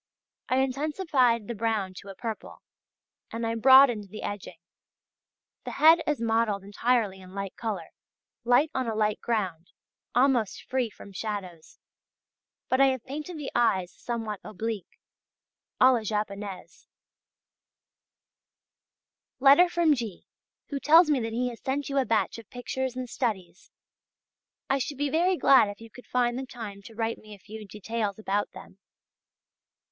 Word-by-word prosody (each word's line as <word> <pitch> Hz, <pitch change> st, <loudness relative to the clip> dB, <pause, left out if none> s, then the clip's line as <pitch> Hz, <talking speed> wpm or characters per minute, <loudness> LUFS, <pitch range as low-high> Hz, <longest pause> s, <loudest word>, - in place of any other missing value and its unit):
I 255 Hz, -, +2 dB
intensified 265 Hz, -, +1 dB
the 235 Hz, -, -3 dB
brown 215 Hz, -3 st, -1 dB
to 200 Hz, -, -10 dB
a 195 Hz, -, -8 dB
purple, 225 Hz, +1 st, -7 dB, 0.7 s
and 230 Hz, 0 st, -3 dB
I 225 Hz, -, -1 dB
broadened 240 Hz, -3 st, +6 dB
the 215 Hz, -, -8 dB
edging. 200 Hz, -4 st, -6 dB, 1.1 s
The -, -, -6 dB
head 325 Hz, +2 st, +6 dB
is 300 Hz, -, 0 dB
modelled 225 Hz, -3 st, +1 dB
entirely 205 Hz, -1 st, 0 dB
in 185 Hz, +1 st, -13 dB
light 195 Hz, -1 st, -5 dB
colour, 205 Hz, -8 st, -4 dB, 0.5 s
light 245 Hz, +6 st, +3 dB
on 260 Hz, -2 st, -1 dB
a 225 Hz, -, -2 dB
light 215 Hz, -1 st, 0 dB
ground, 185 Hz, -7 st, -2 dB, 0.5 s
almost 250 Hz, -5 st, +2 dB
free 255 Hz, -3 st, -1 dB
from 200 Hz, -, -13 dB
shadows; 185 Hz, -6 st, -6 dB, 0.9 s
but 260 Hz, +1 st, +2 dB
I 275 Hz, -, +7 dB
have 260 Hz, -3 st, -1 dB
painted 305 Hz, +5 st, -6 dB
the 295 Hz, -3 st, -5 dB
eyes 190 Hz, -7 st, +2 dB
somewhat 225 Hz, -4 st, -4 dB
oblique, 215 Hz, -1 st, -5 dB, 0.8 s
à 255 Hz, 0 st, +7 dB
la 240 Hz, -, +1 dB
japonaise. 205 Hz, -2 st, -5 dB, 2.5 s
Letter 285 Hz, +7 st, +7 dB
from 340 Hz, -3 st, +3 dB
G.... 230 Hz, -9 st, -5 dB, 0.4 s
who 280 Hz, -, -3 dB
tells 315 Hz, +3 st, +6 dB
me 280 Hz, -, +3 dB
that 225 Hz, -1 st, -3 dB
he 245 Hz, +2 st, -1 dB
has 235 Hz, -, -10 dB
sent 275 Hz, +2 st, -2 dB
you 275 Hz, 0 st, +1 dB
a 265 Hz, -, +1 dB
batch 220 Hz, -1 st, 0 dB
of 220 Hz, -, -14 dB
pictures 255 Hz, +1 st, -4 dB
and 255 Hz, -1 st, -4 dB
studies. 190 Hz, -8 st, -4 dB, 1.0 s
I 275 Hz, 0 st, +1 dB
should 275 Hz, +2 st, -4 dB
be 285 Hz, 0 st, -1 dB
very 355 Hz, +3 st, +2 dB
glad 265 Hz, -9 st, +6 dB
if 205 Hz, -, -8 dB
you 225 Hz, 0 st, -13 dB
could 250 Hz, -, -14 dB
find 245 Hz, 0 st, 0 dB
the 265 Hz, -, -6 dB
time 210 Hz, -5 st, -8 dB
to 225 Hz, -, -12 dB
write 225 Hz, 0 st, -2 dB
me 215 Hz, -1 st, -12 dB
a -, -, -17 dB
few 215 Hz, +2 st, -10 dB
details 210 Hz, 0 st, -3 dB
about 205 Hz, -1 st, -1 dB
them. 190 Hz, -, -13 dB
230 Hz, 150 wpm, -27 LUFS, 205-265 Hz, 2.5 s, I